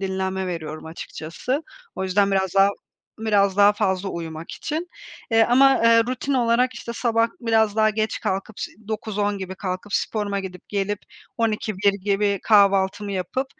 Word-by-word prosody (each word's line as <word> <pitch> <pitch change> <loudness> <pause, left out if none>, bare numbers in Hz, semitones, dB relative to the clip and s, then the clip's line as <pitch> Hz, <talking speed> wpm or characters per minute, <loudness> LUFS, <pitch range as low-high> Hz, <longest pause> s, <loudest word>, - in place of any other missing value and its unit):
dinlenme 190 0 -2
veriyorum 160 -3 -5
açıkçası. 170 - -4 0.3
O 190 - -3
yüzden 195 +1 +2
biraz 190 -2 0
daha 195 0 +6 0.5
biraz 200 -3 +2
daha 205 0 +6
fazla 195 -2 -1
uyumak 165 -2 -6
için, 320 +3 -4 0.4
eee, 225 0 +5
ama 270 +2 +5 0.2
rutin 255 +3 -2
olarak 250 +1 +2
işte 235 - -6
sabah 230 -1 +1
biraz 220 -3 +2
daha 215 0 +4
geç 215 0 -2
kalkıp 195 +2 -3
ş - - -5 0.2
9-10 205 -2 -2
gibi 190 -1 -6
kalkıp 190 +1 -5
sporuma 205 -2 -1
gidip 185 -2 -9
gelip, 205 0 -1 0.4
12-1 215 -3 +1
gibi 200 0 0
kahvaltımı 200 -1 +3
yapıp 195 +8 -2
205 Hz, 145 wpm, -23 LUFS, 190-225 Hz, 0.5 s, daha